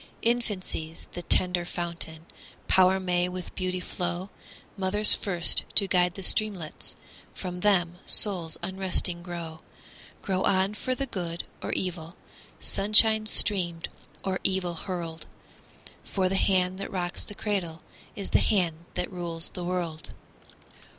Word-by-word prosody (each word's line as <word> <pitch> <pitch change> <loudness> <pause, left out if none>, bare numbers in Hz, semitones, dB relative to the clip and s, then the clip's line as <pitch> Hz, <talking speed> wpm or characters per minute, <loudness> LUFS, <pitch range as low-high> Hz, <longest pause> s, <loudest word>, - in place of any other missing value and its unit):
Infancy's 205 -9 -2
the 175 - -6
tender 180 0 +3
fountain, 170 -2 -4 0.4
Power 190 0 +5
may 180 -1 0
with 180 -1 -7
beauty 185 -1 -2
flow, 180 +1 -4 0.4
Mother's 205 +2 +5
first 175 -4 +2
to 200 - +7
guide 180 -1 +2
the 195 - -7
streamlets, 190 -7 -1 0.4
From 180 -1 -6
them 180 -3 +1
souls 175 -6 +3
unresting 185 -1 -2
grow 170 -2 -7 0.6
Grow 190 -2 -1
on 190 +1 +2
for 255 +4 -3
the 275 - -2
good 175 -8 -5 0.2
or - - -4
evil, 175 -2 -4 0.4
Sunshine 215 +1 +4
streamed 175 -6 +3 0.3
or 190 -1 -2
evil 185 -2 +2
hurled; 170 -2 -6 0.8
For 190 -2 -1
the 190 - -1
hand 185 -1 +1
that 195 - -4
rocks 175 -1 -3
the 205 - -8
cradle 185 -6 -3 0.3
Is 200 - -6
the - - +4
hand 170 -5 0
that 180 - -3
rules 170 -2 -3
the 180 - -6
world. 175 -3 -4
180 Hz, 130 wpm, -27 LUFS, 175-195 Hz, 0.8 s, to